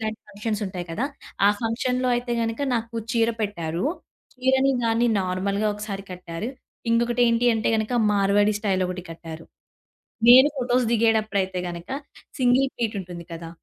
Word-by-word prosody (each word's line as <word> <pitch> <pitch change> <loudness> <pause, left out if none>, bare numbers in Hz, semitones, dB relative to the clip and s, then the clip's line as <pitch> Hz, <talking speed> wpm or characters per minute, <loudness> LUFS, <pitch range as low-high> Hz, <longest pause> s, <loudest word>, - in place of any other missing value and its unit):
ఇలాంటి 220 0 -4
ఫంక్షన్సుంటాయి 200 -4 -4
కదా! 230 - -1 0.4
ఆ - - +7
ఫంక్షన్‌లో 250 +3 0
అయితే 240 0 -3
గనక 225 +2 -2
నాకు 230 0 -3 0.2
చీర 230 0 +3
పెట్టారు. 170 -4 -2 0.5
చీరని 265 +1 +2
దాన్ని 230 +1 +2
నార్మల్‌గా 195 +3 -1
ఒకసారి 205 -2 -5
కట్టారు. 180 +3 -6 0.4
ఇంకొకటేంటి 235 0 +3
అంటే 225 - 0
గనక, 220 +2 -2 0.2
మార్వాడి 205 +1 +3
స్టైలొకటి 185 -3 -1
కట్టారు. 165 -1 -9 0.8
నేను 260 +4 +9
ఫోటోస్ 250 -1 +1
దిగేటప్పుడయితే 215 -4 +1
గనక 170 +1 -8 0.5
సింగిల్ 255 +1 +3
ప్లీటుంటుంది 190 -7 -4
కదా! 165 0 -7
215 Hz, 125 wpm, -24 LUFS, 185-240 Hz, 0.8 s, నేను